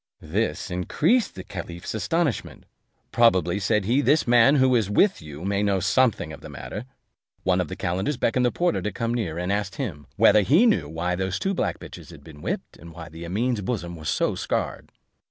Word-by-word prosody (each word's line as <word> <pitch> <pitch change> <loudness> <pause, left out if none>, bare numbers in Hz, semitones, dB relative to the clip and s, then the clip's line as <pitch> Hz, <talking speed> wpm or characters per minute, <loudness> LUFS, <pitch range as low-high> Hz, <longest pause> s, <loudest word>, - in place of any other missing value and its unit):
This 100 +4 -2
increased 160 - +1
the 95 - -7
caliph's 85 -1 -7
astonishment: 150 - -2 0.5
"Probably," 95 -6 +3
said 105 0 +1
he, 125 +7 +2
"this 145 +3 +3
man 120 +4 +6
who 130 -2 +4
is 110 -5 +1
with 195 - +3
you 75 +2 -9
may 100 0 0
know 100 -2 +1
something 100 -3 +1
of 70 - -11
the 80 - -10
matter." 75 - -7 0.6
One 90 0 +2
of 90 - -3
the - - -6
calenders 95 +11 -2
beckoned 125 0 +1
the 125 - +3
porter 175 -1 0
to 105 - -2
come 115 +2 -2
near; 95 -10 -2
and 90 +2 -2
asked 100 -1 -2
him, 75 -7 -5
whether 105 - +6
he 155 - +4
knew 85 - +2
why 85 +3 -2
those 95 +1 -2
two 195 - -1
black - - -1
bitches - - -11
had - - -13
been 75 -2 -13
whipped, - - -4
and 85 0 -12
why 80 0 -9
Amene's 100 +9 -2
bosom 95 -5 -3
was 80 -3 -5
so - - +1
scarred. - - -3
100 Hz, 200 wpm, -24 LUFS, 85-120 Hz, 0.6 s, man